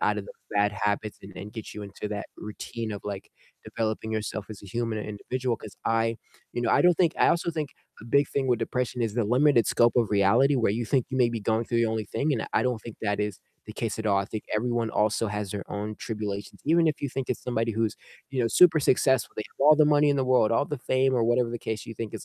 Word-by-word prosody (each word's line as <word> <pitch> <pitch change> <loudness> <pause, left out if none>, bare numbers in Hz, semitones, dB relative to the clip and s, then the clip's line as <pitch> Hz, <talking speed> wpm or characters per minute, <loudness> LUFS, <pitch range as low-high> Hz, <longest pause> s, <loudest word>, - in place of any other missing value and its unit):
out - - +1
of - - -5
the - - -9 0.2
bad 105 0 +2
habits 105 +1 -2
and 100 - -11
and 105 +2 -8
get 110 -2 -7
you 105 - -6
into 100 +1 -6
that 105 -1 -4
routine 110 +1 -6
of, 100 - -6
like, 100 -2 -6 0.3
developing 110 0 -3
yourself 110 -1 -3
as 105 - -9
a - - -11
human 115 +2 -2
and 105 - -5
individual 120 +3 -2
'cause 105 0 -11
I 115 0 +1 0.4
you 120 - -1
know, 115 - +1
I - - +4
don't 180 0 +6
think 165 -1 +2
I - - +5
also 170 0 +1
think 155 -4 -3 0.3
a 115 - -11
big 140 +3 +3
thing 135 -1 -1
with 120 -2 +3
depression 125 +1 -2
is 110 -2 -1
the 120 -2 +1
limited 125 +2 +4
scope 120 0 +3
of 120 -3 +2
reality 115 +8 +4
where 115 -5 +2
you 115 +2 -2
think 130 +1 +1
you 130 - -2
may 120 -2 +4
be 115 -1 -3
going 110 +2 0
through 115 - 0
the 115 - +3
only 110 -1 -1
thing, 150 +2 -1
and - - -1
I - - +3
don't 125 -3 0
think 115 - -9
that 105 -1 0
is 105 -2 -3 0.3
the 110 - -7
case 115 -2 -3
at 110 - -3
all, 100 - +3
I 100 - 0
think 110 0 -6
everyone 120 +1 0
also 110 +2 +1
has 105 -1 -3
their 100 -1 -4
own 105 +1 -4
tribulations. 105 -2 -5
Even 165 +2 +4
if 150 - -2
you 140 - 0
think 135 0 -4
it's - - -2
somebody 115 -2 -1
who's, 110 -1 -1 0.3
you 135 -2 -1
know, 115 - +2
super 165 +5 +6
successful, 130 -1 +2
they 110 - -2
have - - -6
all 155 0 +8
the 155 - +6
money 150 0 +4
in 140 - +2
the 135 - +1
world, 130 -4 +3
all 130 +5 +3
the 150 - -4
fame 130 +2 +1
or 120 - +2
whatever 120 0 +2
the 120 - -4
case 110 -2 -4
you 115 - -7
think 115 -2 -6
is, - - -6
115 Hz, 270 wpm, -27 LUFS, 105-130 Hz, 0.4 s, all